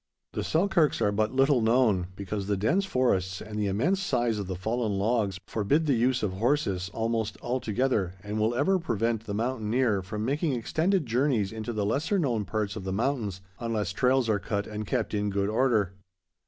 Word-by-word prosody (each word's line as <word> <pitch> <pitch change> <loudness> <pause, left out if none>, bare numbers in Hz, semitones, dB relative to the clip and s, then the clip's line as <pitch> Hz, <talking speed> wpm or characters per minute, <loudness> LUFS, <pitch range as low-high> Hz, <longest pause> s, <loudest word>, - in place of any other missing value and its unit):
The - - -2
Selkirks 170 -3 +2
are 105 - +2
but 110 +1 0
little 135 -1 +3
known, 110 -6 +3
because 100 +1 -4
the 100 -1 +1
dense 170 - +1
forests 95 - +1
and 105 0 -6
the 105 - +1
immense 145 - +1
size 120 - 0
of 100 - -4
the 95 - -3
fallen 110 +4 -1
logs 100 -2 0
forbid 125 +10 +1
the 145 - +3
use 125 +1 +1
of 100 -3 0
horses 100 -5 0
almost 110 -2 -1
altogether, 120 -5 -1
and 105 +1 -3
will 110 +2 +1
ever 185 +9 +2
prevent 115 - -1
the 100 - -4
mountaineer 115 -2 0
from 105 +3 -4
making 145 +3 0
extended 160 - 0
journeys 120 -4 +1
into 110 +1 -4
the 105 -3 -1
lesser 150 - 0
known 120 - 0
parts 100 +1 -2
of 105 - -6
the 95 - -3
mountains, 105 -3 -1 0.2
unless 110 -5 -1
trails 125 +2 +2
are 105 -2 +2
cut 100 0 -2
and 105 -1 -5
kept 120 -5 -1
in 105 0 0
good 100 0 0
order. 110 -5 +2
110 Hz, 190 wpm, -28 LUFS, 100-130 Hz, 0.2 s, little